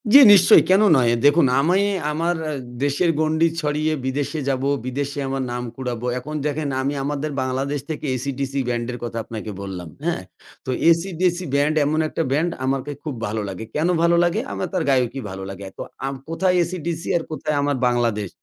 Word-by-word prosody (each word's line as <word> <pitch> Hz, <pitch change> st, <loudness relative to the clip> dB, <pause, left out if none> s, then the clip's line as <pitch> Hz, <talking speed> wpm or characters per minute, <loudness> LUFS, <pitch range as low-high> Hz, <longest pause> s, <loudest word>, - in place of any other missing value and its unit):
জি, 280 Hz, -, +11 dB
নিশ্চয়ই। 190 Hz, -3 st, +7 dB
কেন 190 Hz, +2 st, +5 dB, 0.2 s
নয়? 120 Hz, -2 st, +3 dB
দেখুন 145 Hz, +2 st, +6 dB
আমি 175 Hz, +7 st, +3 dB, 0.3 s
আমার 165 Hz, +3 st, 0 dB
এ -, -, -2 dB, 0.3 s
দেশের 145 Hz, +5 st, +2 dB
গণ্ডি 155 Hz, +1 st, +3 dB
ছড়িয়ে 155 Hz, +1 st, 0 dB
বিদেশে 140 Hz, +4 st, -2 dB
যাবো, 135 Hz, +1 st, 0 dB, 0.2 s
বিদেশে 140 Hz, +3 st, -3 dB
আমার 135 Hz, 0 st, -2 dB
নাম 125 Hz, 0 st, -3 dB
কুড়াবো। 125 Hz, -2 st, -4 dB
এখন 150 Hz, +5 st, -7 dB
দেখেন 150 Hz, 0 st, -1 dB
আমি 140 Hz, +2 st, -1 dB
আমাদের 145 Hz, +2 st, -2 dB
বাংলাদেশ 135 Hz, +3 st, -1 dB
থেকে 155 Hz, -1 st, -4 dB
AC/DC 135 Hz, +1 st, -3 dB, 0.2 s
ব্যান্ডের 120 Hz, +1 st, -2 dB
কথা 115 Hz, -1 st, -4 dB
আপনাকে 110 Hz, -1 st, -6 dB
বললাম। 90 Hz, -4 st, -6 dB, 0.2 s
হ্যাঁ? -, -, -1 dB, 0.4 s
তো -, -, -6 dB, 0.2 s
AC/DC 175 Hz, +1 st, +2 dB, 0.2 s
ব্যান্ড 145 Hz, +2 st, +2 dB
এমন 155 Hz, +2 st, +1 dB
একটা 165 Hz, -, -2 dB
ব্যান্ড 160 Hz, +5 st, +1 dB
আমাকে 135 Hz, +2 st, -1 dB
খুব 150 Hz, -, -4 dB
ভালো 110 Hz, +1 st, -2 dB
লাগে। 95 Hz, +3 st, -6 dB
কেন 155 Hz, +3 st, +1 dB
ভালো 170 Hz, 0 st, +4 dB
লাগে? 175 Hz, +4 st, +1 dB
আমার -, -, -3 dB
তার 180 Hz, -3 st, 0 dB
গায়কী 130 Hz, -1 st, +1 dB
ভালো 95 Hz, 0 st, -6 dB
লাগে। 95 Hz, 0 st, -8 dB
অ্যাঁ 95 Hz, -, -11 dB
তো -, -, -2 dB, 0.2 s
আম 135 Hz, -, -3 dB
কোথায় 180 Hz, +2 st, +1 dB
AC/DC 170 Hz, -1 st, -4 dB
আর 165 Hz, -, -3 dB
কোথায় 155 Hz, 0 st, -2 dB
আমার 145 Hz, -1 st, 0 dB
বাংলাদেশ। 115 Hz, -5 st, 0 dB
140 Hz, 180 wpm, -22 LUFS, 125-160 Hz, 0.4 s, জি